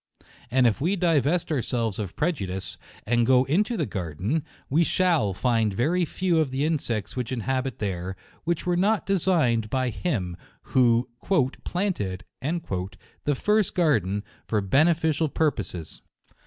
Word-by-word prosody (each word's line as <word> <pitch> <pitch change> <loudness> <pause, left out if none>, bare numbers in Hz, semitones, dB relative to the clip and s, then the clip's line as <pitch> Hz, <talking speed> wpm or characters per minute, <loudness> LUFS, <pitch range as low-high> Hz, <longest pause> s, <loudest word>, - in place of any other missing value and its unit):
And 130 +1 +3
if 115 +2 +2
we 180 +7 +2
divest 170 -2 +2
ourselves 115 -6 -1
of 100 -4 -4
prejudice, 100 - -2 0.3
and 120 +1 +2
go 130 +1 +5
into 205 - +1
the - - 0
garden, 95 - -2 0.2
we 155 +5 +3
shalL 165 - +2
find 115 -3 +1
very 170 - +2
few 175 0 +1
of 155 -4 +2
the 135 +3 -1
insects 125 - -1
which 125 -1 -3
inhabit 130 0 -1
there, 95 -2 -3 0.3
which 170 +1 -1
were 175 -1 +2
not 205 +4 +2
designed 160 - +2
by 130 +1 0
Him 95 - -2 0.4
who 120 -1 +4 0.6
"planted" 105 - -2 0.2
the 135 - -3
first 210 +6 +1
garden, 105 - +2 0.2
for 110 - +1
beneficial 155 - +2
pur 155 +1 +2
poses. 90 - -7
130 Hz, 140 wpm, -26 LUFS, 105-165 Hz, 0.6 s, go